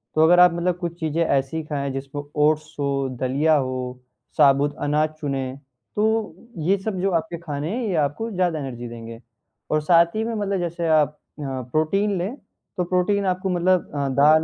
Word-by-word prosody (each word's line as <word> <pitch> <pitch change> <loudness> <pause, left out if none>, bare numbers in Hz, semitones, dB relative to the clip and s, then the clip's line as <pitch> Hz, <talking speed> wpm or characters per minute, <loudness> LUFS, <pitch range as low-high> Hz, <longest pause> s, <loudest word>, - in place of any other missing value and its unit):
तो 155 - +5
अगर 175 +2 +6
आप 180 -1 +7
मतलब 175 +1 0
कुछ 170 -1 -5
चीज़ें 160 +1 0
ऐसी 140 +3 0
खाएँ 140 -2 -2
जिसमें 135 +2 -5
ओट्स 155 +1 +1
हो, 140 -1 0
दलिया 145 +5 +3
हो, 130 -2 -2 0.4
साबुत 145 0 +4
अनाज 150 +1 +2
चुनें, 135 -2 -3 0.4
तो 220 -3 +1 0.2
ये 180 +5 +2
सब 195 -1 -3
जो 195 - +1
आपके 165 0 -1
खाने 150 -1 -4
हैं 250 - -2
ये 190 - -1
आपको 225 +11 -6
ज़्यादा 180 -4 0
एनर्जी 120 -4 -6
देंगे 115 0 -9 0.5
और 155 0 +2
साथ 170 +3 +4
ही 220 - 0
में 230 +1 -2
मतलब 200 -2 -1
जैसे 170 -1 -2
आप 150 -1 +3 0.2
अ, - - -5 0.3
प्रोटीन 195 +7 +1
लें, 190 +9 -3 0.4
तो 180 - +1
प्रोटीन 185 +3 +1
आपको 185 +1 0
मतलब 180 0 +1
अ, 140 -1 0
दाल 150 +4 +5
160 Hz, 185 wpm, -23 LUFS, 140-180 Hz, 0.5 s, आप